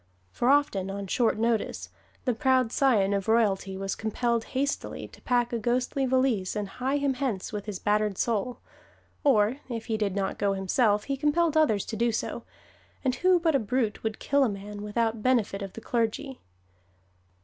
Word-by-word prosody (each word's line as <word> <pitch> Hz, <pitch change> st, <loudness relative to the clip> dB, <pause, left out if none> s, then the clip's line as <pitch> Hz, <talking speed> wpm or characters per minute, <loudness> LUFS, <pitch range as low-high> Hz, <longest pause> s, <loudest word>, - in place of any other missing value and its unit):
For 240 Hz, -, 0 dB
often, 275 Hz, -10 st, +2 dB
on 200 Hz, 0 st, -4 dB
short 225 Hz, +3 st, +1 dB
notice, 230 Hz, 0 st, -1 dB, 0.4 s
the 250 Hz, -, +2 dB
proud 255 Hz, 0 st, +2 dB
scion 220 Hz, -9 st, +3 dB
of 200 Hz, -1 st, -1 dB
royalty 205 Hz, -4 st, +2 dB
was 195 Hz, 0 st, -2 dB
compelled 230 Hz, +1 st, -1 dB
hastily 280 Hz, +2 st, -2 dB
to -, -, -17 dB
pack 245 Hz, -1 st, +1 dB
a 235 Hz, -, 0 dB
ghostly 250 Hz, +4 st, 0 dB
valise 255 Hz, -7 st, +1 dB
and 210 Hz, -1 st, -2 dB
his 265 Hz, +6 st, -1 dB
him 275 Hz, -1 st, +2 dB
hence 250 Hz, -7 st, -3 dB
with 210 Hz, 0 st, -5 dB
his 205 Hz, -3 st, -3 dB
battered 210 Hz, 0 st, 0 dB
soul; 235 Hz, +1 st, -1 dB, 0.6 s
or 225 Hz, -3 st, +3 dB
if 230 Hz, -2 st, -4 dB
he 220 Hz, -2 st, -1 dB
did 205 Hz, -3 st, -1 dB
not 195 Hz, -1 st, -2 dB
go 200 Hz, -1 st, +2 dB
himself 205 Hz, +2 st, +2 dB
he 275 Hz, -, -2 dB
compelled 305 Hz, +3 st, +1 dB
others 250 Hz, -11 st, +3 dB
to 225 Hz, -, -5 dB
do 235 Hz, +2 st, +1 dB
so, 220 Hz, -, -3 dB, 0.6 s
and 255 Hz, -, +2 dB
who 365 Hz, +2 st, +4 dB
but 330 Hz, -2 st, +2 dB
a 275 Hz, -, +3 dB
brute 225 Hz, -1 st, -1 dB
would 220 Hz, -1 st, -3 dB
kill 280 Hz, 0 st, +2 dB
a 255 Hz, -, +2 dB
man 205 Hz, +1 st, -7 dB
without 225 Hz, +1 st, -1 dB
benefit 225 Hz, -5 st, +1 dB
of 195 Hz, -1 st, -6 dB
the 225 Hz, -, -8 dB
clergy! 245 Hz, +4 st, -2 dB
230 Hz, 180 wpm, -27 LUFS, 205-260 Hz, 0.6 s, who